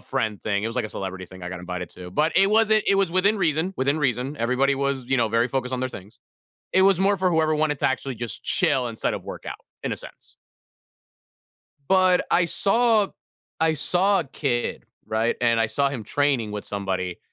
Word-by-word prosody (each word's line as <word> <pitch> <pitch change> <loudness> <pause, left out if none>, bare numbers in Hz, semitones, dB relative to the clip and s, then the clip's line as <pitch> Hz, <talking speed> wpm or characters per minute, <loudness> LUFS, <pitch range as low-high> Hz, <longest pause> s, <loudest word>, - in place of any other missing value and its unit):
friend 110 -2 -3
thing. 105 -1 -1
It - - 0
was, 115 - -4
like, 125 - -1
a - - -4
celebrity 95 -2 -5
thing 95 -1 -13
I 90 - -4
got 90 -1 -6
invited 90 0 -5
to, 90 0 -10
but 155 - +1
it 195 +2 +5
wasn't 220 0 +4
it - - +3
was 195 -4 +1
within 200 +4 +3
reason, 165 +1 0
within 140 +4 +1
reason. 135 +1 -1
Everybody 125 +3 +1
was, 135 -2 -1
you 130 +1 +1
know, 115 -3 +2
very 115 +2 +2
focused 130 0 -2
on 130 - -1
their 130 - -1
things. 105 0 -11 0.5
It 190 - +5
was 190 -2 +4
more 200 +1 +3
for 185 -1 +1
whoever 160 -1 +2
wanted 150 -2 0
to - - +3
actually 130 0 -3
just 120 0 -5
chill 140 -8 +3
instead 115 -1 -2
of - - -7
workout, - - -8 0.2
in - - -2
a - - -3
sense. - - -12 1.6
But 185 -1 +4
I 180 - +4
saw 215 +4 +2 0.5
I 160 0 +2
saw 185 +6 +2
a - - -4
kid, 130 -3 -2 0.2
right, 110 +2 0
and 115 -1 +3
I 115 - +3
saw 140 +5 +1
him 130 -6 -6
training 135 -5 0
with 105 - -5
somebody. 95 -3 -3
135 Hz, 210 wpm, -24 LUFS, 115-175 Hz, 1.6 s, it